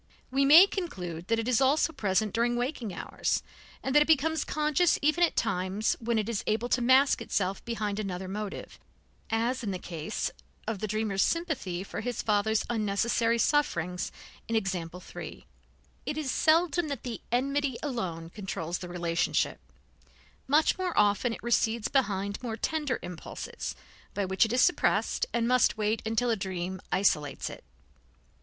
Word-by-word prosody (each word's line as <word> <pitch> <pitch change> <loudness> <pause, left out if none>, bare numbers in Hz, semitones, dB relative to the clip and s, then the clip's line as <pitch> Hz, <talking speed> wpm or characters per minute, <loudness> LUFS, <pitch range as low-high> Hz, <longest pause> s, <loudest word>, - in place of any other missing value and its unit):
We 275 +1 +3
may 315 +7 +10
conclude 180 - -5
that 230 - +2
it 225 +1 -2
is 250 0 +3
also 295 +4 +3
present 205 -1 0
during 235 +1 +1
waking 245 -3 -2
hours, 175 - -2 0.4
and 265 - -1
that 295 - +7
it 295 - +3
becomes 320 0 +3
conscious 305 +3 +2
even 310 +4 +3
at 340 - +2
times 195 -1 0
when 230 0 0
it 215 -1 0
is 230 -3 -2
able 225 +3 0
to 245 - +2
mask 260 +3 +4
itself 190 0 -1
behind 215 -3 -2
another 190 -2 -4
motive, 205 +1 -6 0.5
as 235 +4 0
in 210 - -2
the 190 - -2
case 170 +2 -4 0.3
of 225 -3 -3
the 215 - -2
dreamer's 215 -2 0
sympathy 290 - -1
for - - -6
his 245 -2 -3
father's 215 +1 +1
unnecessary 230 +1 +1
sufferings 180 - 0 0.4
in 230 - -1
example 180 -5 -2
3. - - -9 0.6
It 295 - -2
is 295 -4 -1
seldom 330 +1 +3
that 280 -5 -5
the 240 -3 -5
enmity 275 +1 0
alone 180 - -3
controls 175 -4 -4
the 180 - -7
relationship; 175 -1 0 0.9
much 300 +6 +3
more 365 -2 -2
often 205 +3 +3
it - - -7
recedes 230 -2 +1
behind 200 -6 0
more 230 -3 -4
tender 295 0 -1
impulses, 180 - -6 0.4
by 200 - 0
which 190 +3 +3
it 220 - -4
is 250 - +4
suppressed, 360 - +2
and 235 -1 0
must 250 -2 +3
wait 215 +1 0
until 235 +2 +1
a - - +2
dream 185 -2 -4
isolates 150 -7 +1
it. - - -11
225 Hz, 165 wpm, -29 LUFS, 195-270 Hz, 0.9 s, may